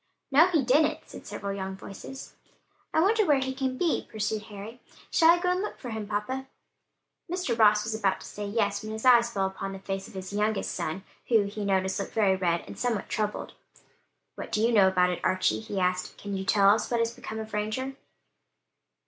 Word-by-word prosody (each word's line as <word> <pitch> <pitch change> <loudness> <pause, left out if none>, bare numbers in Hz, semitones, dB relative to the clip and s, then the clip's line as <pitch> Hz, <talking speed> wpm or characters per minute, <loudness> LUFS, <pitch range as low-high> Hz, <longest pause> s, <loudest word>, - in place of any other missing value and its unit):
"No, 305 +6 +7
he 325 -6 +2
didn't," 300 +5 +3
said - - -11
several 200 -1 -4
young 190 -1 -4
voices. 200 +7 -9 0.6
"I 315 - +3
wonder 430 +5 +4
where 300 -7 +4
he 265 0 -2
can 260 -1 -2
be," 340 +1 0
pursued 215 0 -2
Harry. 210 +4 -9 0.3
"Shall 325 - +5
I 340 - +7
go 360 +1 0
and 365 +1 0
look 420 - -4
for 245 - -7
him, 220 -2 -4
papa?" 255 +6 -3 0.8
Mr. 360 -10 -1
Ross 210 -2 +5
was 220 +1 -3
about 200 -4 0
to - - -10
say 205 0 -6
yes, 205 -1 0
when 215 0 -6
his 220 +3 -6
eye 245 -2 +8
fell 235 -5 -1
upon 195 0 -4
the 195 - -7
face 195 +1 -4
of 230 - -15
his 190 +1 -6
youngest 210 0 0
son 185 +5 -3 0.2
who, 225 -4 +4
he 205 +1 -5
noticed, 190 -1 +1
looked 195 - -5
very 200 -4 +4
red 175 -2 0
and - - -11
somewhat 240 -5 -1
troubled. 210 -1 -2 0.8
"What - - -8
do 215 - +1
you 235 - +3
know 205 -4 +6
about 180 -1 +3
it, 175 - -4
Archie?" 185 -13 +2
he 190 - -4
asked; 180 0 -1
"can 200 -1 -5
you 190 0 -3
tell 200 0 +5
us 215 +1 +1
what 235 - +1
has 230 0 0
become 220 - -7
of 220 -1 -7
Ranger?" 220 +6 -2
215 Hz, 215 wpm, -28 LUFS, 195-250 Hz, 0.8 s, eye